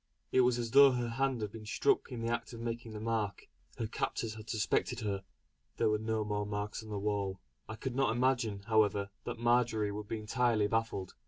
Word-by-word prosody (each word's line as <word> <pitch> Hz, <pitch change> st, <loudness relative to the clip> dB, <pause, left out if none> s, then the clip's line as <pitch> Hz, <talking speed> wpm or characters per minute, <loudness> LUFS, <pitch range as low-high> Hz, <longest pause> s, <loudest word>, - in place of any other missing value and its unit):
It 130 Hz, -, +5 dB
was 125 Hz, -1 st, +3 dB
as 115 Hz, -2 st, -3 dB
though 140 Hz, 0 st, +8 dB
her 120 Hz, -1 st, -1 dB
hand 130 Hz, 0 st, 0 dB
had 105 Hz, -2 st, -3 dB
been 110 Hz, -1 st, -9 dB
struck 405 Hz, -, +2 dB
in 120 Hz, -2 st, -4 dB
the 115 Hz, -, 0 dB
act 120 Hz, +1 st, -4 dB
of 115 Hz, -, -7 dB
making 115 Hz, -1 st, -4 dB
the 105 Hz, -, -5 dB
mark. 110 Hz, -3 st, -2 dB, 0.3 s
Her 115 Hz, -, -1 dB
captors 110 Hz, 0 st, -2 dB
had 110 Hz, 0 st, -10 dB
suspected 110 Hz, -3 st, 0 dB
her. 100 Hz, -2 st, -2 dB, 0.5 s
There -, -, +3 dB
were 105 Hz, -, +1 dB
no 110 Hz, 0 st, -1 dB
more 105 Hz, -1 st, -1 dB
marks 105 Hz, +1 st, -3 dB
on 110 Hz, -, -11 dB
the 105 Hz, -, -3 dB
wall. 100 Hz, -2 st, -1 dB, 0.3 s
I 110 Hz, -, -4 dB
could 130 Hz, +2 st, -4 dB
not 135 Hz, 0 st, +3 dB
imagine, 120 Hz, -4 st, +1 dB
however, 105 Hz, -2 st, +2 dB
that -, -, -4 dB
Marjory 120 Hz, -3 st, +2 dB
would 105 Hz, 0 st, -6 dB
be 115 Hz, -, -2 dB
entirely 110 Hz, 0 st, +1 dB
baffled. 110 Hz, -3 st, -1 dB
110 Hz, 215 wpm, -33 LUFS, 105-120 Hz, 0.5 s, though